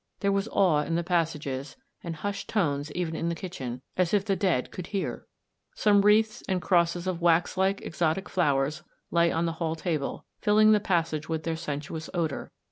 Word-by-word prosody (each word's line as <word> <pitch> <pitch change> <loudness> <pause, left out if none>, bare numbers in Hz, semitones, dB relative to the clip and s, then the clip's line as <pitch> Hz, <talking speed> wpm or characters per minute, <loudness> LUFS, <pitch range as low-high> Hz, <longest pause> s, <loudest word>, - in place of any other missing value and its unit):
There 200 -1 +2
was 200 +2 0
awe 180 -9 +3
in 165 +2 -2
the 170 - 0
passages, 155 - -2 0.3
and 170 -1 -4
hushed 200 +6 -4
tones 145 -7 0
even 170 -2 -2
in 165 +1 -1
the 170 - -1
kitchen, 130 -8 -6
as 185 +2 +2
if 200 -1 +1
the 195 -2 +1
dead 180 -11 0
could 180 - -7
hear! 195 -2 -3 0.5
Some 205 -1 +4
wreaths 215 +1 +3
and 185 -1 +1
crosses 175 -1 +2
of 180 -2 -2
wax 170 +1 +3
like 190 +1 +1
exotic 170 +3 -1
flow 150 -7 +2
ers 145 +3 -2 0.3
lay 170 0 +3
on 165 +1 0
the 165 - 0
hall 160 -1 0
table, 155 -3 -3
filling 215 +1 +5
the 210 - +5
passage 165 -6 -1
with 160 -1 -2
their 165 -1 -1
sensuous 160 0 -5
odour. 160 -5 -2
170 Hz, 195 wpm, -27 LUFS, 160-195 Hz, 0.5 s, filling